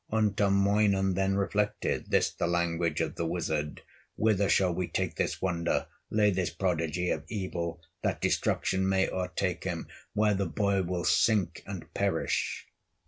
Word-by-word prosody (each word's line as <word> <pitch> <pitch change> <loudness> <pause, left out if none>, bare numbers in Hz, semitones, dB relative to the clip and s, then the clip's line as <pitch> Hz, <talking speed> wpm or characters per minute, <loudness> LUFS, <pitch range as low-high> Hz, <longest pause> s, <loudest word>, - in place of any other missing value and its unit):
Untamoinen 100 -2 +3
then 95 +1 +1
reflected, 100 +2 -1
This - - +3
the 85 - -2
language 85 -2 0
of - - -1
the 85 - -3
wizard: 80 -3 -2 0.3
"Whither 105 -3 +2
shall 90 0 +3
we 90 0 -2
take - - -1
this - - -2
wonder, 85 -2 0 0.2
Lay 105 -1 +3
this 90 -2 0
prodigy 90 -1 -1
of 75 - -2
evil, 85 -4 -3 0.2
That - - -1
destruction 95 0 +1
may 95 0 +3
o'ertake 90 0 -2
him, 85 -3 -3 0.3
Where 105 0 +3
the 100 0 0
boy 100 -2 +1
will 90 -1 -2
sink 105 -5 +2
and - - -7
perish?" - - -1
95 Hz, 145 wpm, -29 LUFS, 85-100 Hz, 0.3 s, Untamoinen